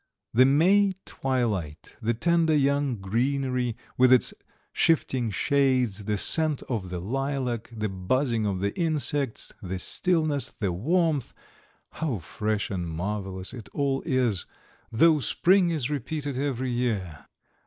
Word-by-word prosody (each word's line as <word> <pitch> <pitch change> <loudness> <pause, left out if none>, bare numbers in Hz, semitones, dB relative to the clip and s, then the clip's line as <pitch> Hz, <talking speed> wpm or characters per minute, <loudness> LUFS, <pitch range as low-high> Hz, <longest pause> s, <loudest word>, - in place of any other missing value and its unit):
The 125 +3 +6
May 190 +8 +4
twilight, 110 - -3
the 115 +1 0
tender 165 +4 +2
young 140 -2 +1
greenery 125 +4 -1 0.2
with 130 0 +6
its 130 - +4 0.4
shifting 130 -7 +2
shades, 125 -4 +1
the 105 0 0
scent 155 +6 +2
of 105 -7 -4
the 90 - -4
lilac, 130 +2 -2
the 110 -2 -3
buzzing 110 +4 0
of 95 -2 -2
the 100 +1 -1
insects, 145 -6 -1
the 95 -1 -4
stillness, 155 - +1
the 100 -4 -3
warmth 155 - 0 0.6
how 155 -8 -2
fresh 105 +6 -3
and 90 -3 -3
marvellous 95 +3 -4
it 115 -5 -9
all 140 -2 0
is, 125 - 0 0.4
though 155 +7 +4
spring 180 +6 +3
is 150 -5 -1
repeated 145 0 -3
every 130 -2 -2
year! 105 -11 -2
125 Hz, 130 wpm, -26 LUFS, 105-145 Hz, 0.6 s, The